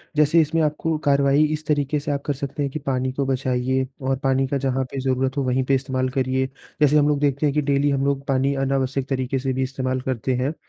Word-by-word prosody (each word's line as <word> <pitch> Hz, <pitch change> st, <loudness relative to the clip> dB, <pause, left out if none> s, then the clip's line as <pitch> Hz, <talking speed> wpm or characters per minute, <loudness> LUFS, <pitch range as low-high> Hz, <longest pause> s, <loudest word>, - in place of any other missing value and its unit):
जैसे 150 Hz, +2 st, +5 dB
इसमें 160 Hz, +1 st, 0 dB
आपको 155 Hz, +1 st, 0 dB
कार्रवाई 140 Hz, +1 st, +4 dB
इस 155 Hz, 0 st, -5 dB
तरीके 145 Hz, 0 st, +1 dB
से 145 Hz, 0 st, -3 dB
आप 140 Hz, -1 st, -1 dB
कर 145 Hz, -, 0 dB
सकते 140 Hz, +1 st, -4 dB
हैं 140 Hz, -, -2 dB
कि 155 Hz, -, -4 dB
पानी 130 Hz, -2 st, -1 dB
को 140 Hz, +1 st, -1 dB
बचाइए 130 Hz, 0 st, 0 dB, 0.2 s
और 135 Hz, -, +1 dB
पानी 135 Hz, 0 st, +2 dB
का 140 Hz, -, -1 dB
जहाँ 135 Hz, -1 st, 0 dB
पे 135 Hz, -, -4 dB
ज़रूरत 130 Hz, +1 st, -1 dB
हो, 140 Hz, -, +1 dB
वहीं 130 Hz, +1 st, +1 dB
पे 135 Hz, +1 st, +2 dB
इस्तेमाल 130 Hz, -1 st, -1 dB
करिए। 130 Hz, 0 st, 0 dB, 0.4 s
जैसे 150 Hz, +1 st, +5 dB
हम 145 Hz, -1 st, +4 dB
लोग 145 Hz, -, +1 dB
देखते 140 Hz, 0 st, +1 dB
हैं 145 Hz, -, +2 dB
कि 150 Hz, -, +3 dB
डेली 140 Hz, 0 st, +1 dB
हम 140 Hz, -1 st, 0 dB
लोग 140 Hz, 0 st, -1 dB
पानी 135 Hz, +1 st, +1 dB
अनावश्यक 135 Hz, 0 st, -1 dB
तरीके 130 Hz, 0 st, -1 dB
से 130 Hz, 0 st, -1 dB
भी 130 Hz, -, 0 dB
इस्तेमाल 130 Hz, -1 st, -2 dB
करते 130 Hz, 0 st, -2 dB
हैं, 130 Hz, +5 st, -1 dB
135 Hz, 240 wpm, -22 LUFS, 130-145 Hz, 0.4 s, जैसे